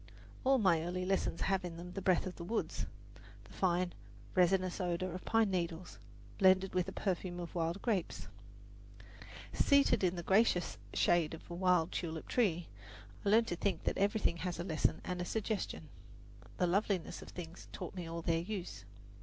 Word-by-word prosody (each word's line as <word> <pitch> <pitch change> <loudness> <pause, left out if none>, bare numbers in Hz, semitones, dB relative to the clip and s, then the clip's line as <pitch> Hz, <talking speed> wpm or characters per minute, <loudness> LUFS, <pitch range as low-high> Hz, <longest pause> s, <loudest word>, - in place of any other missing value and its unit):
All 270 +1 +5
my 185 -8 +4
early 180 +2 -2
lessons 190 -3 0
have 195 -1 +1
in 170 -2 -6
them 175 +1 -8
the 195 - -5
breath 185 -2 +3
of 185 - -5
the 170 - -6
woods 220 +7 -2 0.6
the - - -16
fine, 180 -1 +1 0.4
resinous 185 +1 +2
odour 180 +1 -1
of 180 +2 -6
pine 225 -3 +3
needles, 175 -1 -3 0.4
blended 190 0 +5
with 180 -1 +1
the - - -4
perfume 180 -2 -2
of 170 -1 -6
wild 170 +2 -1
grapes. 205 -8 -1 1.3
Seated 280 -6 +4
in 180 -1 +2
the 175 - -4
gracious 190 -1 +2 0.2
shade 165 -2 +3
of - - -14
a - - -3
wild 180 -2 +2
tulip 160 -2 -4
tree, 175 -8 +1 0.6
I 200 - +1
learned 225 +2 +5
to 175 - -1
think 195 +3 -1
that - - -1
everything 200 -3 +2
has 180 0 -3
a - - -1
lesson 160 -3 0
and 180 -1 -3
a - - 0
suggestion. 205 -6 -3 0.7
"The 180 - +2
loveliness 190 0 0
of - - -10
things 170 0 -8
taught - - -6
me 180 -3 -5
all 165 0 -5
their 165 0 +1
use." 175 - -5
180 Hz, 180 wpm, -34 LUFS, 170-195 Hz, 1.3 s, All